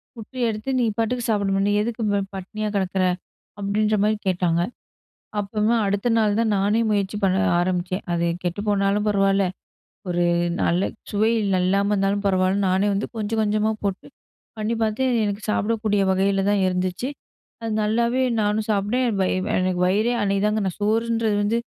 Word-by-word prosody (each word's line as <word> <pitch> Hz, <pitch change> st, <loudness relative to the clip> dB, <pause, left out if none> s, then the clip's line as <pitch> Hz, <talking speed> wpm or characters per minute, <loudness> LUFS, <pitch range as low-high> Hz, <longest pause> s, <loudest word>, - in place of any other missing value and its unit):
குட்டி 235 Hz, +3 st, -9 dB
எடுத்து 215 Hz, +4 st, -4 dB
நீ -, -, +2 dB
பாட்டுக்கு 235 Hz, +2 st, -1 dB
சாப்பிடுமா, 195 Hz, -2 st, +1 dB
நீ -, -, +2 dB
எதுக்கு 235 Hz, +1 st, -3 dB
பா 200 Hz, -, +2 dB, 0.2 s
பட்னியா 215 Hz, +3 st, -4 dB
கெடக்குற?" 190 Hz, -1 st, 0 dB, 0.6 s
அப்படின்ற 210 Hz, +2 st, +1 dB
மாரி 215 Hz, 0 st, +2 dB
கேட்டாங்க. 175 Hz, -2 st, +1 dB, 0.8 s
அப்பமே 210 Hz, +3 st, 0 dB
அடுத்த 200 Hz, +4 st, 0 dB
நாள் 210 Hz, -1 st, +2 dB
தா -, -, +3 dB
நானே 205 Hz, +4 st, +2 dB
முயற்சி 200 Hz, 0 st, 0 dB
பண்ண 190 Hz, -1 st, +2 dB, 0.2 s
ஆரம்பிச்சேன். 180 Hz, +1 st, -1 dB
அது 170 Hz, 0 st, 0 dB, 0.2 s
கெட்டு 175 Hz, +3 st, -2 dB
போனாலும் 200 Hz, +1 st, +1 dB
பரவால்ல, 195 Hz, -1 st, +2 dB, 0.6 s
ஒரு 175 Hz, 0 st, +1 dB, 0.4 s
நல்ல 175 Hz, +3 st, +2 dB, 0.3 s
சுவை 215 Hz, +2 st, +2 dB
இல் 195 Hz, -2 st, +1 dB
இல்லாம 200 Hz, +2 st, +2 dB
இருந்தாலும் 200 Hz, +1 st, 0 dB
பரவால்ல. 185 Hz, 0 st, +2 dB
நானே 190 Hz, +2 st, +2 dB
வந்து 200 Hz, -, -1 dB
கொஞ்ச 215 Hz, -1 st, -3 dB
கொஞ்சமா 215 Hz, +1 st, +1 dB
போட்டு 195 Hz, -1 st, -3 dB, 0.5 s
பண்ணி 215 Hz, +2 st, -1 dB
பாத்து, 220 Hz, +4 st, 0 dB, 0.2 s
எனக்கு 205 Hz, 0 st, -3 dB
சாப்பிடக்கூடிய 210 Hz, -1 st, 0 dB
வகையில 195 Hz, +1 st, +1 dB
தான் 205 Hz, -1 st, +2 dB
இருந்துச்சு. 185 Hz, +6 st, -1 dB, 0.5 s
அது 225 Hz, -, -3 dB
நல்லாவே 235 Hz, +4 st, +1 dB, 0.2 s
நானும் 210 Hz, +1 st, 0 dB
சாப்ட்டேன். 210 Hz, +5 st, +1 dB
எனக்கு 200 Hz, -4 st, 0 dB
வயி 185 Hz, -, 0 dB, 0.2 s
எனக்கு 185 Hz, -1 st, 0 dB
வயிறே 215 Hz, +6 st, +2 dB
அன்னைக்கு 200 Hz, 0 st, +1 dB
தாங்க 210 Hz, 0 st, 0 dB
நா 185 Hz, -, -1 dB
சோறுன்றது 225 Hz, 0 st, +1 dB
வந்து 225 Hz, +3 st, +1 dB
205 Hz, 155 wpm, -23 LUFS, 195-215 Hz, 0.8 s, தா